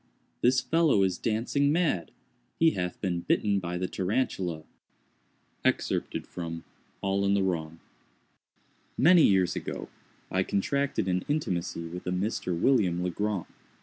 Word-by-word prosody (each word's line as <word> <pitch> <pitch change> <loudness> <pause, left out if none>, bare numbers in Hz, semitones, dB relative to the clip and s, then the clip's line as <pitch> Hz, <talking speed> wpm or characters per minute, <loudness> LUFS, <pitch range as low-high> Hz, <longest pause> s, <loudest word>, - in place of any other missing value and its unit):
this 130 +2 +4
fellow 160 -11 +3
is 95 -2 0
dancing 125 +6 +1
mad! 155 - +1 0.5
He 165 0 +5
hath 90 - -3
been 90 -3 -1
bitten 100 +3 +1
by 90 -1 -4
the 90 +1 -1
Tarantula. 95 -5 -1 1.0
—All 90 +3 -2
in 100 0 +2
the 100 - +2
Wrong. 80 -3 -2 1.2
Many 170 +5 +6
years 95 - +4
ago, - - -5 0.4
I 95 - +2
contracted 135 +6 0
an 90 0 0
intimacy 90 - -2
with 90 +2 -7
a - - 0
Mr. 90 -2 -1
William 90 -10 +2
Legrand. 100 +2 -1
95 Hz, 120 wpm, -28 LUFS, 90-120 Hz, 1.2 s, Many